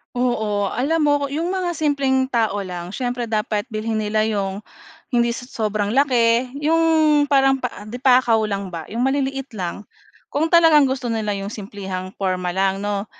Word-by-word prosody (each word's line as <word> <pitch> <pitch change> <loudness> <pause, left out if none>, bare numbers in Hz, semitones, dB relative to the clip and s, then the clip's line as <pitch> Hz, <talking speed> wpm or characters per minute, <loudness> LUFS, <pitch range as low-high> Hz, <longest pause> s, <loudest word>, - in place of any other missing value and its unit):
Oo. 220 -5 0
Alam 300 +7 0
mo 290 - +4 0.2
'yung 330 +6 -2
mga 365 -2 -1
simpleng 280 -5 +1
tao 225 -5 0
lang 175 -1 -6
siyempre 245 +1 -3
dapat 210 -1 0
bilhin 220 +1 -3
nila 215 0 0
'yung 200 -3 -2 0.6
hindi 235 0 +3
sa 245 +1 -6
sobrang 215 -3 -2
laki 250 -3 +3
'yung 320 +3 +2 0.5
parang 270 -1 +3
pa 230 -4 -5
di 235 +4 -7
pakaw 250 -4 +4
lang 200 -3 -3
ba, 165 - -4
'yung 240 +4 0
maliliit 270 -2 -2
lang 190 +1 -5 0.4
kung 320 +3 -1
talagang 325 -3 +6
gusto 265 -2 -1
nila 220 -2 -1
'yung 195 -1 -3
simplehang 195 -3 -6
porma 185 -2 -1
lang 195 +2 0
'no. 205 0 -2
230 Hz, 165 wpm, -21 LUFS, 205-270 Hz, 0.6 s, talagang